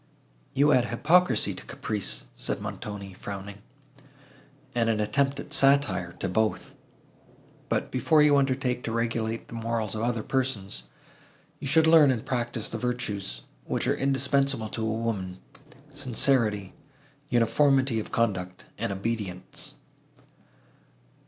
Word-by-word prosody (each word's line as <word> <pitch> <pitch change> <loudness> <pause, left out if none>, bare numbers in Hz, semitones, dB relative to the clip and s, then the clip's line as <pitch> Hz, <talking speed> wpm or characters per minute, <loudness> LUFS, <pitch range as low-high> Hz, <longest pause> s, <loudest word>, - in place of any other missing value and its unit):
"You 145 +2 +4
add 125 -3 +4
hypocrisy 165 +10 +3
to - - -9
caprice," 100 - -3
said - - -2
Montoni, 100 -2 -6
frowning, 100 +1 -7 1.1
"and 115 -2 +1
an 110 -2 +1
attempt 135 +6 +1
at 145 - -7
satire, 135 -10 +3
to - - -4
both; 110 +4 -1 1.0
but, - - -1
before 150 +4 +4
you 150 -1 +5
undertake 130 -2 +1
to 115 - -2
regulate 115 0 -2
the - - -12
morals 115 -2 -2
of 110 - -3
other 120 -1 -1
persons, 110 - -2 0.7
you - - -5
should 160 +3 +4
learn 160 -3 +7
and 120 -4 -1
practise 120 -3 -2
the 115 - -4
virtues, 105 - -3 0.2
which - - -1
are - - +2
indispensable 135 -3 +1
to 115 - -5
a - - 0
woman—sincerity, 115 +1 -2 0.6
uniformity 130 +1 +3
of 110 - -6
conduct 95 -5 -1
and - - -1
obedience." 100 -2 -4
115 Hz, 125 wpm, -27 LUFS, 105-135 Hz, 1.1 s, learn